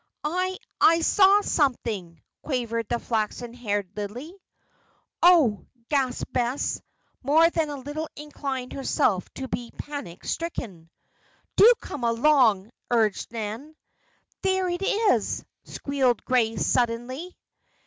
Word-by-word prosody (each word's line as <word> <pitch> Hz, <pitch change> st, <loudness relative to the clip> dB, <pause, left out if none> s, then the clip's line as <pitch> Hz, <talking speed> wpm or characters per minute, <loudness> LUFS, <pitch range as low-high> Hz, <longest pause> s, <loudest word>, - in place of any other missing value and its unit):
"I 365 Hz, +4 st, -1 dB, 0.2 s
I 330 Hz, +1 st, +5 dB
saw 395 Hz, +4 st, +5 dB
something," 225 Hz, -, -1 dB, 0.2 s
quavered 230 Hz, -5 st, -2 dB
the 240 Hz, -, +1 dB
flaxen 230 Hz, +1 st, -3 dB
haired 205 Hz, -6 st, -3 dB
Lillie. 225 Hz, -, -6 dB, 0.9 s
"Oh!" 315 Hz, -, +5 dB, 0.2 s
gasped 265 Hz, -4 st, -1 dB
Bess, 245 Hz, +3 st, -1 dB, 0.4 s
more 310 Hz, +5 st, +5 dB
than 320 Hz, -3 st, 0 dB
a 290 Hz, -, -4 dB
little 290 Hz, +4 st, -5 dB
inclined 275 Hz, -4 st, -5 dB
herself 250 Hz, -, 0 dB
to 265 Hz, -, -5 dB
be 240 Hz, -2 st, -4 dB
panic 285 Hz, -13 st, -7 dB
stricken. 200 Hz, -, -5 dB, 0.7 s
"Do 450 Hz, +4 st, +8 dB
come 265 Hz, -, -7 dB
along!" 230 Hz, -4 st, +3 dB, 0.2 s
urged 225 Hz, -4 st, +1 dB
Nan. 230 Hz, +7 st, -6 dB, 0.7 s
"There 380 Hz, -1 st, +1 dB
it 350 Hz, +1 st, -3 dB
is!" 415 Hz, +2 st, +1 dB, 0.2 s
squealed 265 Hz, -4 st, -1 dB
Grace, 230 Hz, -3 st, +1 dB
suddenly. 250 Hz, +8 st, -1 dB
255 Hz, 110 wpm, -25 LUFS, 230-310 Hz, 0.9 s, Do